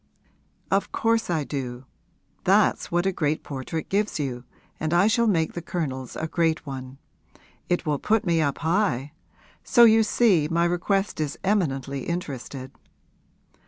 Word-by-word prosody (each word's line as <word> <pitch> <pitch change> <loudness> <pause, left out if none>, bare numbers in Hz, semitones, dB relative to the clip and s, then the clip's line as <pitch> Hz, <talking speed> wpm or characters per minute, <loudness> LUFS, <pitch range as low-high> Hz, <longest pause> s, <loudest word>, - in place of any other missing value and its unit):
'Of 195 +1 +1
course 225 -2 +1
I 160 -4 0
do. 130 -3 -5 0.6
That's 195 +2 +3
what 175 +1 +1
a 195 - +2
great 155 -4 -1
portrait 140 +3 -5
gives 205 +2 0
you, 130 -4 -4 0.3
and 155 +2 0
I 175 +3 +5
shall 225 +2 +3
make 165 -6 +1
the 175 - -5
Colonel's 135 -7 -4
a 160 - -3
great 160 0 0
one. 130 -1 -7 0.7
It 175 0 0
will 150 -2 0
put 220 0 +1
me 170 -2 +2
up 145 -3 0
high. 160 - 0 0.5
So 240 - +5
you 225 -1 +7
see 205 -8 +3
my 170 +1 +1
request 185 +2 0
is 145 -2 -3
eminently 140 -9 -1
interested.' 135 -6 -5
165 Hz, 150 wpm, -25 LUFS, 140-195 Hz, 0.7 s, you